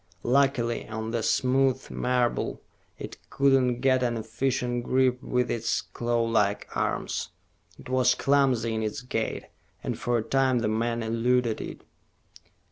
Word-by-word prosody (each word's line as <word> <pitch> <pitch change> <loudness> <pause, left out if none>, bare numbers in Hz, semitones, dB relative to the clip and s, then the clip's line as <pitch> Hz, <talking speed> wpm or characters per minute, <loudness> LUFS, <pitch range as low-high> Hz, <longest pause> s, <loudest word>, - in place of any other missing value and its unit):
Luckily, 125 -2 +1
on 110 +1 -4
the 115 -1 -1
smooth 130 +2 +1
marble 125 -1 0 0.4
it - - -8
could 140 0 +3
not 125 -2 +2
get 130 -1 +3
an 120 -2 0
efficient 120 +2 -2
grip 130 0 +2
with 125 -2 0
its 115 -1 0
clawlike 115 -4 0
arms. - - -2 0.5
It - - -13
was 130 0 +3
clumsy 130 -5 +2
in 110 - -1
its 110 +5 -3
gait, 115 -3 -3 0.4
and - - -3
for 120 0 0
a 110 - -1
time 130 0 +2
the 115 -2 0
man 115 +2 -1
eluded 115 +1 +1
it. - - -8
120 Hz, 140 wpm, -27 LUFS, 115-130 Hz, 0.5 s, could